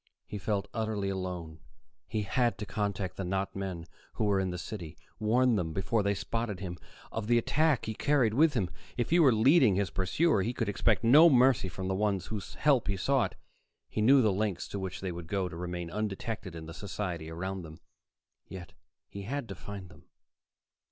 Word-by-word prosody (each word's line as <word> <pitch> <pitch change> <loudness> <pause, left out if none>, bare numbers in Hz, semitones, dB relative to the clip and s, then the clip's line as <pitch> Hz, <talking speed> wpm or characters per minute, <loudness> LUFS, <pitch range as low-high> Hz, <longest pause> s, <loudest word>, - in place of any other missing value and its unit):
He 105 - -6
felt 100 0 -1
utterly 110 -3 -1
alone; 90 -4 -5 0.5
he 110 -2 -2
had 120 +4 +1
to 105 - -5
contact 100 -3 -3
the 95 - -3
not 95 +2 -2
men 95 -4 -4 0.3
who - - -2
were 100 -2 +2
in 95 -1 0
the 90 - -4
city, 85 -3 -7 0.2
warn 120 +2 +3
them, 80 -4 -2
before 100 +5 0
they 100 0 +1
spotted 105 0 -3
him, 90 -3 -6 0.3
of 110 -1 -4
the 120 0 +4
attack 150 +3 +2
he 110 - -3
carried 130 -3 +2
with 150 +3 +4
him. 95 -7 0 0.3
If 120 +2 -1
he 175 - +5
were 145 -6 +7
leading 120 - +5
his 100 0 0
pursuer, 100 - +2
he 115 +6 -1
could 115 -3 -2
expect 105 +2 +2
no 150 +9 +8
mercy 130 -6 +4
from 95 +2 -5
the 95 - 0
ones 100 -1 0
whose 105 -3 -6
help 140 -5 +3
he 95 - -1
sought. 135 +6 +1 0.5
He 110 - -2
knew 130 +4 +6
the 105 -3 +3
lengths 100 -2 -1
to 100 - -4
which 95 -1 -5
they 95 -2 -3
would 85 -1 -7
go 95 0 -1
to 85 - -8
remain 90 0 -5
undetected 105 -1 -4
in 80 -1 -7
the 80 - -8
society 90 -4 -4
around 95 +3 -4
them. 80 -2 -11 0.7
Yet 90 -3 -9 0.3
he 100 - -8
had 130 +5 -4
to - - -4
find 95 +2 -8
them. - - -17
100 Hz, 200 wpm, -30 LUFS, 95-115 Hz, 0.7 s, no